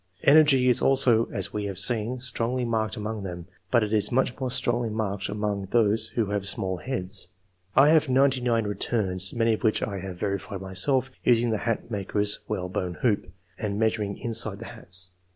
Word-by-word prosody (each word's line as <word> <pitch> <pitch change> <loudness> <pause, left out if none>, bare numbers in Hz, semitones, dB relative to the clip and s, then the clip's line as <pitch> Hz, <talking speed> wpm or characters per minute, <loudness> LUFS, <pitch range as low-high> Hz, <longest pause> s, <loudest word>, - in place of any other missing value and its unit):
Energy 140 -3 +5
is 125 - +4
also, 125 -4 +4
as - - -2
we 105 -1 -3
have 100 -2 -5
seen, 115 +4 0
strongly 125 0 -1
marked 110 -2 -1
among 110 0 -4
them; 90 -3 -7 0.2
but 120 +1 +3
it 105 0 -3
is 105 -2 +2
much 125 0 +1
more 130 -1 -2
strongly 120 -1 0
marked 105 -2 -3
among 105 -2 -3
those 110 -1 +2
who 110 -4 0
have 100 -1 -2
small 95 -1 -1
heads. 95 -6 -2 0.5
I 135 +3 +6
have 155 -3 +3
ninety 135 0 +3
nine 115 -3 +1
returns, 95 -3 +1
many 115 -1 +1
of 110 - -4
which 110 -2 +1
I 100 -2 -3
have 95 -1 -7
verified 100 0 -3
myself, 125 +8 +1
using 120 -1 +3
the 110 - 0
hat 115 -2 -1
II.] - - -21
QUALITIES. - - -16
99 100 -2 -3 0.2
maker^s 105 0 0
whalebone 90 -1 -3
hoop, 105 -7 0 0.3
and 105 -2 -3
measuring 110 -2 -1
inside 115 -3 +1
the 115 - -9
hate. 90 -6 -4
110 Hz, 195 wpm, -26 LUFS, 100-120 Hz, 0.5 s, I